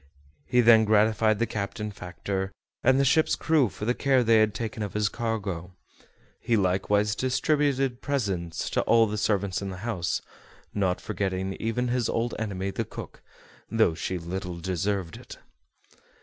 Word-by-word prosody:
He 125 0 +4
then 115 -1 +7
gratified 110 0 +3
the 115 - +1
captain, 105 0 -4
factor, 95 +1 -4 0.3
and 130 +2 +4
the 140 - +3
ship's 155 +4 +3
crew 155 -8 +2
for 105 - -7
the 120 - +2
care 135 -1 +2
they 115 -1 +5
had 110 -1 +2
taken 110 0 -4
of 105 -1 -4
his 105 -1 +2
cargo. 100 -7 -4 0.6
He 115 - +1
likewise 100 +2 +1
distributed 135 -1 +1
presents 95 -12 -2
to - - +2
all 115 -1 +5
the 105 0 -3
servants 100 -2 0
in 100 - -4
the 95 - -6
house, 100 -8 -1 0.5
not 95 -3 0
forgetting 95 -2 -2
even 115 +2 -1
his 120 -2 0
old 115 +1 -1
enemy 100 -3 -3
the - - -2
cook, - - -9 0.5
though 110 -7 +3
she 90 +3 -3
little 90 +1 -5
deserved 95 0 -2
it. - - -11
105 Hz, 160 wpm, -27 LUFS, 95-115 Hz, 0.6 s, then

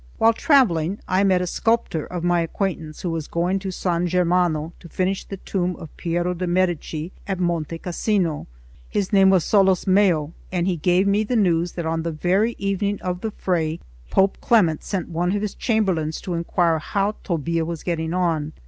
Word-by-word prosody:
While 225 +1 +5
travelling, 205 - +3
I 185 +2 +2
met 185 -2 +3
a - - -1
sculptor 200 -4 0
of 175 -2 -5
my 175 -1 +2
acquaintance, 165 -2 -3
who 175 - -1
was 160 -2 -3
going 180 +3 0
to 190 0 -5
San 180 -1 -1
Germano 175 -2 +1
to 170 - -13
finish 185 +3 -1
the 195 - -7
tomb 180 -1 -2
of 160 - -11
Piero 175 +1 -1
de' 180 +1 -3
Medici 175 -2 -1 0.2
at 195 -2 -2
Monte 170 -2 -1
Cassino. 175 -2 -1 0.4
His 205 0 -2
name 195 -1 +6
was 190 -3 +4
Solosmeo, 190 -5 +3 0.2
and 175 -2 0
he 185 -2 0
gave 180 +4 +2
me 200 +2 +2
the 245 +4 -2
news 175 -5 +2
that 170 - -4
on 165 0 -1
the 165 +1 -2
very 190 +9 +1
evening 200 +1 -1
of 180 0 -3
the 220 - -2
fray, 165 -6 -1 0.3
Pope 195 0 +2
Clement 180 -10 +3
sent 190 -4 -3
one 175 +3 0
of 205 - -1
his 210 - -2
chamberlains 185 -9 0
to 180 - -4
inquire 170 -1 +1
how 200 +6 0
Tobbia 165 -1 -1
was 165 -1 -5
getting 160 -2 -2
on. 165 -4 0
180 Hz, 185 wpm, -22 LUFS, 165-195 Hz, 0.4 s, name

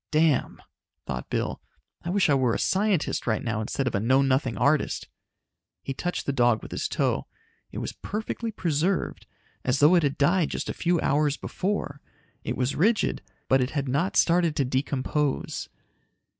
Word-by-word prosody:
"Damn," 155 -3 +2 0.5
thought 65 -1 -5
Bill. - - -2 0.4
"I 175 - -4
wish 190 0 +3
I 145 - +4
were 130 -4 +2
a - - 0
scientist 195 -8 0
right 110 -2 0
now 115 -2 -1
instead 135 +5 -2
of - - -1
a - - +1
know 130 +6 +3
nothing 130 -4 +1
artist!" 145 +5 +1 0.8
He 135 - -3
touched 175 +6 -3
the 140 - 0
dog 120 -4 +3
with - - -9
his - - -2
toe. - - 0 0.4
It - - -8
was - - -4
perfectly 220 +2 -4
preserved, 175 -1 -1 0.4
as 125 +1 +1
though 150 +5 +6
it 175 - +5
had 140 -2 0
died 165 +3 +3
just - - -4
a - - -1
few 175 -1 +1
hours 145 0 +2
before. 180 -7 -3 0.4
It - - -3
was 130 +2 0
rigid, 215 +7 +2 0.3
but 135 0 +4
it 125 - 0
had 140 -1 -1
not 145 +9 0
started 170 -2 +3
to 140 - +1
decompose. 135 +2 -1
145 Hz, 175 wpm, -26 LUFS, 130-175 Hz, 0.8 s, though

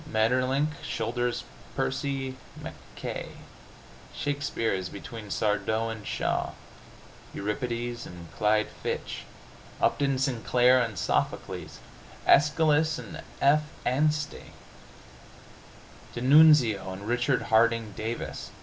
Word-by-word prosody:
Maeterlinck 130 +5 +2
shoulders 120 +2 -1 0.3
Percy 135 -2 -2 0.2
Mackaye. - - -7 0.8
Shakespeare 145 -6 -1
is 95 -1 -3
between 105 +1 -8
Sardou 110 +2 0
and 110 -2 -8
Shaw. - - -1 0.8
Euripides 120 +3 -3
and 85 -2 -11
Clyde 105 0 +2
Fitch! - - -3 0.5
Upton 140 -2 +2
Sinclair 125 -1 +3
and 115 -5 -2
Sophocles! - - -2 0.5
Aeschylus 155 +1 +4
and 165 0 -8 0.2
F. 145 +2 +6 0.2
Anstey! 150 +3 0 1.6
D'Annunzio 130 -6 +6
and 100 +2 -7
Richard 125 +2 +1
Harding 115 -1 +4
Davis! 115 +2 -4
120 Hz, 85 wpm, -28 LUFS, 110-140 Hz, 1.6 s, F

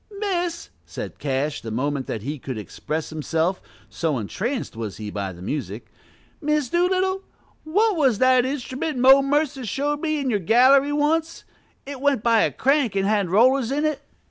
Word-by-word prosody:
"Miss," 355 -4 -2
said - - -8
Cash, 145 +1 -2
the 115 - -7
moment 135 +4 -2
that 110 - -4
he 145 +3 -4
could 130 -2 -6
express 155 +9 -5
himself, 160 +4 -1 0.3
so 160 -5 -2
entranced 215 - -4
was 110 -3 -5
he 105 -1 -6
by 100 -2 -4
the 90 0 -11
music, 110 - -5 0.5
"Miss 300 -3 0
Doolittle, 375 +2 +1 0.4
what 410 +6 +2
was 270 -9 +2
the 255 0 +4
instrument 260 +2 -3
Mo 265 +2 +7
Mercer 285 -1 0
showed 290 +6 -2
me 310 -2 -1
in 270 -3 -1
your 205 - +1
gallery 260 - +4
once, 315 +3 0 0.4
it 275 -1 -7
went 280 -6 +1
by 230 -2 +4
a - - +2
crank 270 -6 +1
and 195 0 +1
had 200 -3 +1
rollers 245 +5 +3
in 295 +2 0
it?" 305 -2 -1
255 Hz, 170 wpm, -23 LUFS, -, 0.5 s, Mo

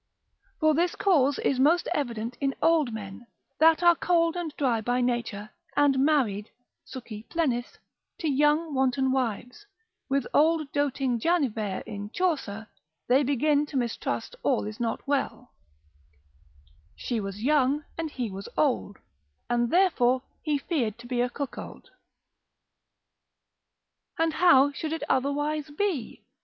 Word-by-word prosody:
For 310 -1 +4
this 345 +3 +1
cause 290 -8 +3
is 265 - 0
most 320 +6 +3
evident 235 -4 -3
in 275 -1 0
old 320 -6 +3
men, 220 +1 -8 0.3
that 320 +2 +5
are 345 0 +7
cold 335 -1 +1
and 345 -3 -3
dry 245 -6 +1
by 245 +3 0
nature, 235 -4 -2 0.3
and 285 -2 +4
married, 255 -8 +1 0.3
succi 225 -4 -9
plenis, 255 -8 -1 0.4
to 325 - -3
young 295 +3 +2
wanton 265 0 +1
wives; 250 - -3 0.4
with 275 -2 +1
old 310 -1 +3
doting 270 -4 0
Janivere 225 - 0
in 205 -1 -6
Chaucer, 270 - -2 0.4
they 255 +3 +4
begin 290 +2 +1
to 285 - -4
mistrust 240 - -3
all 255 -6 +1
is 215 +1 -7
not 230 +1 -3
well, 275 -3 -2 1.4
———She 240 -3 -3
was 195 +1 -6
young 290 +1 +2
and 325 -1 -3
he 245 -7 -4
was 195 +1 -7
old, 255 -8 0 0.5
And 240 0 +1
therefore 260 -8 +3 0.2
he 300 -2 0
feared 265 - -2
to 235 - -13
be 240 0 -1
a 250 - +1
cuckold. 280 +1 -7 2.3
And 325 -1 +1
how 285 -6 +5
should 310 +2 -4
it 325 -3 -4
otherwise 290 +3 0
be? 300 - -3
270 Hz, 135 wpm, -27 LUFS, 240-310 Hz, 2.3 s, are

